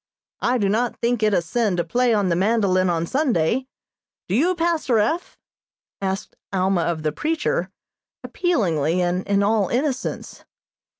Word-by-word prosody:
I 250 +1 +2
do 205 -4 +1
not 225 +4 0
think 235 -1 0
it 215 -1 +3
a 180 -4 +2
sin 205 +1 0
to 170 - +1
play 240 +9 +1
on 205 -4 +2
the 170 - +2
mandolin 190 -2 +2
on 170 -1 0
Sunday. 255 - 0 0.6
Do 180 - -3
you, 335 - +2
Pastor 330 -8 +1
F.?" 235 - -1 0.6
asked 190 0 -3 0.2
Alma 190 -1 +1
of 165 -1 -2
the 155 - 0
preacher, 300 - -1 0.5
appealingly, 180 - 0
and 180 +1 0
in 200 0 +2
all 210 -1 +2
innocence. 260 +1 -3
205 Hz, 155 wpm, -22 LUFS, 180-250 Hz, 0.6 s, it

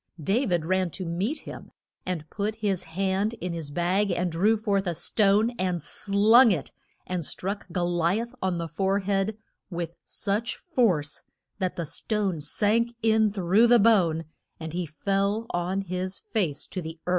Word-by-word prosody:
Da 210 - +1
vid 175 -3 0
ran 185 +1 +1
to 185 +3 -5
meet 195 - -2
him, - - -9 0.4
and 165 -4 -3
put 210 +1 -2
his 200 -4 -1
hand 195 +6 -1
in 180 -5 -4
his 165 -4 -5
bag 180 +6 +1
and 175 0 0
drew 205 +7 +3
forth 200 -3 0
a 175 - -1
stone, 210 +6 +3
and 180 -2 0
slung 210 - +4
it, 150 -8 -2 0.3
and 180 -2 -3
struck 195 +6 -4
Go 175 +1 0
li 175 +3 +1
ath 235 +2 -5
on 185 -2 0
the 170 -1 -3
fore 195 +5 0
head 200 +2 0 0.3
with 170 -2 -4
such 215 +4 -2
force 205 - 0 0.4
that 185 -2 -1
the 170 - -3
stone 190 +1 -1
sank 230 +9 +1
in 220 -1 +4
through 200 +4 +3
the 240 0 +7
bone 185 -8 +3 0.3
and 160 -1 -6
he 175 -1 -2
fell 200 +7 0
on 180 +3 -1
his 185 0 -4
face 195 - -2
to 185 - -5
the 160 0 -7
earth. - - -3
190 Hz, 175 wpm, -26 LUFS, 175-210 Hz, 0.4 s, the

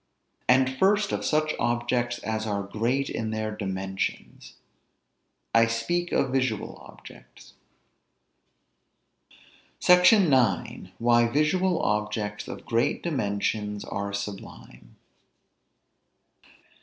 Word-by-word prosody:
And 130 0 +3
first 205 +1 +3
of - - -2
such 155 0 +1
objects 120 +1 0
as 110 0 -2
are 100 -1 -2
great 120 +7 -1
in 110 -1 -3
their 110 0 -3
dimensions. 95 -1 -5 1.0
I 115 0 +5
speak 115 +11 -2
of 130 - +1
visual 130 -5 -1
objects. - - -15 2.3
SECTION 180 -2 +6
IX. 120 -6 +1
WHY 120 0 +3
VISUAL 165 +7 +1
OBJECTS 105 0 -2
OF - - -8
GREAT 115 +1 0
DIMENSIONS 105 -7 -2
ARE 100 0 -4
SUBLIME. 100 -11 -8
115 Hz, 95 wpm, -26 LUFS, 105-135 Hz, 2.3 s, SECTION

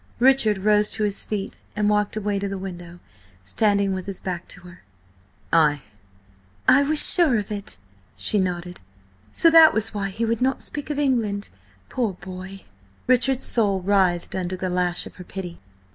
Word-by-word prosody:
Richard 245 -4 +3
rose 210 +1 +2
to 215 - -3
his 205 -1 -1
feet 205 -2 -5 0.2
and 210 0 0
walked 210 0 0
away 205 -1 -2
to 200 - -3
the 195 - -5
window, 175 -2 -9 0.4
standing 200 - +1
with 185 +1 -6
his 195 -2 -4
back 180 -2 -6
to - - -9
her. 180 0 -15 0.7
"Ay!" 150 -4 +3 0.8
"I 260 +2 +6
was 300 +2 0
sure 320 -10 +7
of 205 0 -5
it," 205 -1 -4 0.4
she 210 - 0
nodded. 180 -1 -3 0.5
"So 330 - +4
that 325 -1 +7
was 220 0 -1
why 200 -1 -3
he 225 +4 -3
would 230 0 -2
not 265 +1 0
speak 290 0 -5
of 295 - -3
England? 230 -8 -1 0.4
Poor 235 -6 -2
boy!" 190 +1 -10 0.4
Richard's 255 +1 +1
soul 205 -5 +1
writhed 185 -2 +1
under 185 0 -3
the 185 0 -3
lash 180 -1 0
of - - -13
her 180 - -9
pity. 180 -1 -8
200 Hz, 175 wpm, -22 LUFS, 185-225 Hz, 0.8 s, sure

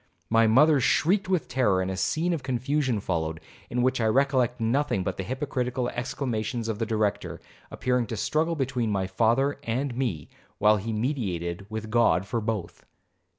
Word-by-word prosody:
My 115 0 +5
mother 145 +6 +5
shrieked 190 - +2
with 185 -5 +1
terror, 125 -7 +2
and 95 0 -1
a - - -3
scene 160 - 0
of 160 - -2
confusion 130 -1 0
followed, 80 -4 -2 0.3
in 120 0 0
which 130 -1 +1
I 110 - +2
recollect 130 0 +2
nothing 115 -3 +1
but - - -3
the 95 - -3
hypocritical 125 0 -2
exclamations 120 -2 -3
of 110 -2 -3
the 115 - -1
Director, 105 -3 -1 0.3
appearing 125 -2 0
to - - -4
struggle 160 +2 0
between 130 -5 -1
my 100 -2 0
father 120 +8 +1
and 125 +1 -2
me, 110 - -2 0.3
while 105 0 +4
he 110 +3 -4
mediated 100 - -2
with 110 0 -5
God 115 -5 +3
for 115 +3 -2
both. 105 -6 -4
120 Hz, 170 wpm, -26 LUFS, 105-135 Hz, 0.3 s, My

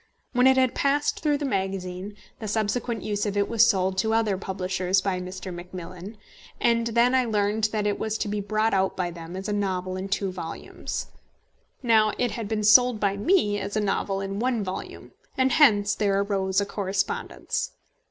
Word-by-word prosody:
When 250 +1 +5
it 265 0 +5
had 260 -2 +3
passed 285 +1 +1
through 295 -2 +1
the 290 - -3
magazine, 190 -3 -3 0.2
the 220 - -5
subsequent 220 +2 -1
use 205 0 -1
of 205 0 -2
it 200 0 +2
was 230 0 +4
sold 190 -1 +1
to 220 +3 +1
other 220 -3 +2
publishers 185 0 -1
by 190 -1 -1
Mr. 185 0 -7
Macmillan, 180 +3 -8 0.4
and 235 0 +2
then 235 +2 +3
I 260 -1 +3
learned 210 -1 +1
that 215 -1 -1
it 205 -1 0
was 220 0 -1
to 220 - -2
be 205 0 -2
brought 215 +2 0
out 190 0 +1
by 180 -2 -1
them 170 +1 -9
as 190 +2 -5
a 210 - -1
novel 185 -2 -2
in 190 +1 -5
two 195 -1 -1
volumes. 170 -3 -6 0.8
Now 220 -3 +4
it 245 -2 0
had 225 -1 -4
been 215 0 -1
sold 240 +2 +6
by 200 -1 +1
me 205 - +2
as 200 +2 -3
a - - +3
novel 195 -1 -1
in 195 +1 -4
one 240 -2 0
volume, 185 0 -7 0.3
and 260 0 +3
hence 210 -10 +5
there 200 -2 +1
arose 195 -1 0
a 200 - 0
correspondence. 200 - -2
205 Hz, 190 wpm, -25 LUFS, 190-225 Hz, 0.8 s, sold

